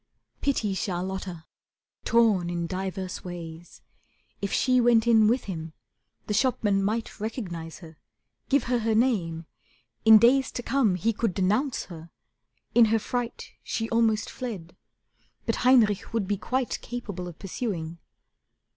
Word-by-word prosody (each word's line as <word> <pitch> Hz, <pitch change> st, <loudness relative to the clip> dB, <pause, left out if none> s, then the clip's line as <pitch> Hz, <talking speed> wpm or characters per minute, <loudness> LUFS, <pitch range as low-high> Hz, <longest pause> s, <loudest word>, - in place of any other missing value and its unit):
Pity 225 Hz, -8 st, 0 dB
Charlotta, 185 Hz, -2 st, -4 dB, 0.6 s
torn 215 Hz, -7 st, +3 dB
in 170 Hz, -1 st, -2 dB
diverse 190 Hz, +1 st, -4 dB
ways. 170 Hz, -1 st, -9 dB, 0.6 s
If 200 Hz, -, -2 dB
she 255 Hz, -1 st, +3 dB
went 235 Hz, -1 st, +4 dB
in 225 Hz, -2 st, +5 dB
with 240 Hz, +3 st, +2 dB
him, 160 Hz, -4 st, -6 dB, 0.5 s
the 210 Hz, -, -2 dB
shopman 215 Hz, -4 st, +2 dB
might 220 Hz, +2 st, -2 dB
Recognize 180 Hz, -7 st, -5 dB
her, 160 Hz, -2 st, -13 dB, 0.5 s
give 280 Hz, +1 st, +3 dB
her 245 Hz, 0 st, 0 dB
her 225 Hz, -1 st, 0 dB
name; 180 Hz, -9 st, +1 dB, 0.6 s
in 220 Hz, 0 st, +9 dB
days 260 Hz, +4 st, +4 dB
To 245 Hz, -, -4 dB
come 240 Hz, -9 st, +2 dB
he 220 Hz, +6 st, 0 dB
could 215 Hz, -3 st, -1 dB
denounce 210 Hz, +9 st, +1 dB
her. 165 Hz, -2 st, -11 dB, 0.6 s
In 235 Hz, -1 st, +7 dB
her 225 Hz, +1 st, +2 dB
fright 245 Hz, -, -4 dB
She 225 Hz, 0 st, -3 dB
almost 225 Hz, -1 st, +2 dB
fled. 200 Hz, -10 st, -7 dB, 0.7 s
But -, -, 0 dB
Heinrich 235 Hz, -6 st, +3 dB
would 220 Hz, -4 st, 0 dB
be 205 Hz, -, +1 dB
quite 255 Hz, +5 st, -2 dB
Capable 205 Hz, -7 st, -6 dB
of 170 Hz, -2 st, -9 dB
pursuing. 175 Hz, -5 st, -4 dB
210 Hz, 140 wpm, -26 LUFS, 180-235 Hz, 0.7 s, in